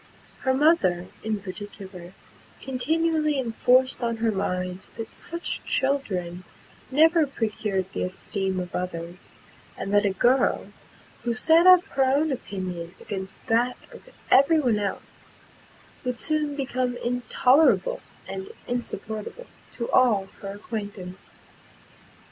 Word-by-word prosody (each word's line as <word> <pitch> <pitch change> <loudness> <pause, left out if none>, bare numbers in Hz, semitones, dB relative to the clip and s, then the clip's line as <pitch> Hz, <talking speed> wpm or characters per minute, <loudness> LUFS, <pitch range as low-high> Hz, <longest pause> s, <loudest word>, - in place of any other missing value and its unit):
Her 260 -1 +1
mother, 190 - +3
in 215 -2 -2
particular, 190 -2 -9 0.5
continually 305 +3 0
enforced 255 +1 +2
on 230 -1 -1
her 225 0 +1
mind, 180 -2 -2 0.2
that 225 -1 -7
such 340 +1 -3
children 185 -11 -1 0.5
never 320 +3 +5
procured 215 -6 -2
the - - -3
esteem 190 0 -2
of 180 -1 -6
others; 175 0 -5 0.5
and 195 - -4
that 205 0 +5
a 200 - +3
girl, 245 +7 +2 0.5
who 235 -1 -1
set 330 +7 +5
up 365 -1 +9
her 270 - +2
own 285 +4 +2
opinion 185 -8 -5
against 190 -1 -7
that 245 +1 +2
of - - -14 0.2
every 295 +4 +6
one 240 -7 +2
else, 200 -2 -6 0.7
would 250 -1 -2
soon 300 +3 0
become 255 -3 -1
intolerable 255 - +3 0.3
and 385 +1 -6 0.2
insupportable 235 - -4 0.3
to 235 - -4
all 210 -7 +4
her 195 0 -5
acquaintance. 205 -4 -7
230 Hz, 120 wpm, -25 LUFS, 195-275 Hz, 0.7 s, up